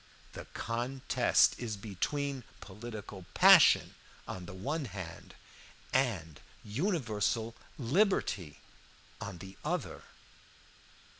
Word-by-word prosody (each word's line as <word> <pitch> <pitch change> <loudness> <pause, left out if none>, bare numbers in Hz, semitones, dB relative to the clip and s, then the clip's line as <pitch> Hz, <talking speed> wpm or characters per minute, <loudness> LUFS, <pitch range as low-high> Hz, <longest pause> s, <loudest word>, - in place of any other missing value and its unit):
"The - - -8
contest 120 +3 +2
is 110 -4 -3
between 130 +7 -2 0.2
political 105 -2 -9
passion - - +7 0.3
on 90 -1 -6
the - - -8
one 145 - -2
hand 95 -6 -8 0.6
and 95 - 0 0.2
universal 115 - -1 0.2
liberty 135 - +1 0.6
on 100 -5 -5
the 95 +2 -11
other. - - -2
110 Hz, 85 wpm, -32 LUFS, 95-135 Hz, 0.6 s, passion